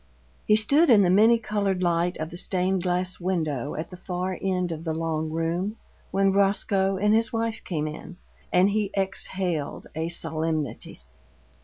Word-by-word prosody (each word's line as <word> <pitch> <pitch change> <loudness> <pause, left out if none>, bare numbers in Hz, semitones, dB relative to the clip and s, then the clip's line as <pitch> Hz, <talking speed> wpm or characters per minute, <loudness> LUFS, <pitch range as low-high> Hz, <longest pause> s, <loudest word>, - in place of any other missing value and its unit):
He 210 - +6
stood 280 +10 +4
in 215 -5 +7
the 180 - +3
many 220 +5 +6
colored 200 -4 -1
light 175 +1 +1
of 155 +1 -5
the - - -8
stained 185 0 0
glass 180 0 -1
window 155 -7 -2
at 155 +4 -5
the 180 - -9
far 180 0 -3
end 180 -2 -1
of 160 0 -5
the 160 -2 -2
long 160 -1 -2
room, 170 +6 -2 0.3
when 195 0 +2
Roscoe 195 -1 +2
and 210 +2 +2
his 225 +1 +2
wife 225 -1 -2
came 155 -4 -2
in, 160 +3 -8 0.3
and 185 +3 +4
he 210 -1 0
exhaled 190 -5 -2
a 160 +1 -2
solemnity. 155 - -3
185 Hz, 165 wpm, -25 LUFS, 165-200 Hz, 0.3 s, in